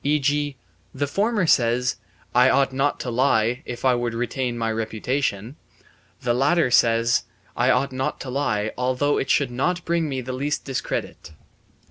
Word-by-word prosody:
E.g., 145 -1 0 0.4
the 145 +2 0
former 205 - 0
says: 125 -3 +2 0.4
"I 125 +2 +5
ought 135 0 +2
not 135 +2 0
to 125 - -4
lie, 120 -1 +2
if 120 +1 -6
I 130 - +5
would 120 -1 -2
retain 120 +1 -2
my 115 -1 -1
reputation"; 110 +2 -2 0.7
the 120 - +1
latter 140 +2 +2
says: 115 0 +3 0.3
"I - - +2
ought 140 0 +2
not 130 +1 -3
to 130 - -6
lie, 110 -6 -1
although 130 +3 +1
it 135 - -3
should 140 -4 +2
not 170 +8 -1
bring 165 -2 0
me 135 -2 -3
the 130 +1 -5
least 140 +3 -2
discredit." 130 - -4
130 Hz, 160 wpm, -23 LUFS, 120-145 Hz, 0.7 s, I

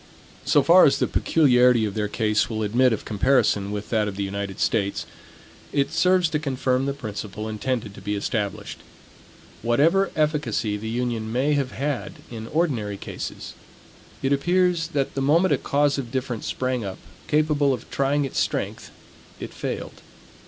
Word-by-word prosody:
So 145 - +4
far 180 +2 +7
as 140 - +4
the - - +1
peculiarity 125 -6 +3
of 105 - -3
their 105 0 -1
case 105 0 0
will 110 -1 -2
admit 120 +5 +3
of 110 - -3
comparison 105 -3 +2
with 105 0 -5
that 110 -2 +2
of 100 - -4
the 100 - -2
United 100 0 -4
States, 100 -3 0 0.7
it 140 0 0
serves 180 +1 +3
to 155 -1 -1
confirm 130 -2 0
the 140 - 0
principle 105 -4 -6
intended 110 0 -3
to - - -12
be 105 0 -2
established. 100 0 -3 0.8
Whatever 160 - +3
efficacy 145 -9 0
the 110 +2 -5
union 115 -2 -2
may 135 +5 +1
have 140 -3 -1
had 140 -1 -3 0.2
in 110 -1 -7
ordinary 120 -11 -1
cases, - - -7 0.7
it 135 +1 +2
appears 175 +2 +2
that 140 -2 0
the 135 - -2
moment 165 +7 +3
a - - +2
cause 145 0 +1
of 125 -4 -6
difference 125 -4 -3
sprang 130 -2 -1
up, 95 -1 -5 0.3
capable 150 -2 +2
of 125 -3 -4
trying 140 +1 +1
its 135 - -3
strength, - - -2 0.5
it - - -7
failed. - - -5
125 Hz, 165 wpm, -24 LUFS, 110-145 Hz, 0.8 s, far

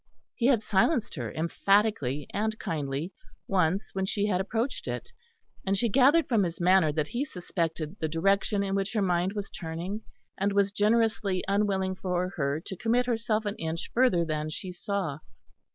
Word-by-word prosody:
He 240 - +1
had 240 -6 +3
silenced 215 +5 +2
her 120 -8 -4
emphatically 165 - +1
and 220 +1 -1
kindly 150 +1 -3 0.3
once 185 +1 +1
when 190 0 -1
she 205 +1 0
had 190 -3 +1
approached 225 +6 -2
it; - - -4 0.5
and 195 +1 +1
she 235 +3 +1
gathered 275 +8 +5
from 230 -5 +3
his 170 -3 -2
manner 180 -3 +4
that 150 0 -1
he 245 +3 -1
suspected 170 - -3
the 160 - 0
direction 195 +5 +1
in 195 -1 -2
which 195 +2 -1
her 215 - +1
mind 180 +1 +1
was 205 -2 -5
turning 175 +5 -5 0.4
and 200 +1 +1
was 200 0 +3
generously 210 -2 +2
unwilling 195 -2 +1
for 180 -1 -1
her 140 -4 -1
to 190 - -6
commit 235 +6 +1
herself 225 -2 0
an 205 0 -2
inch 160 +1 -4
further 230 -9 +3
than 155 -1 -2
she 180 +4 -5
saw. 180 -5 -3
195 Hz, 170 wpm, -28 LUFS, 170-215 Hz, 0.5 s, gathered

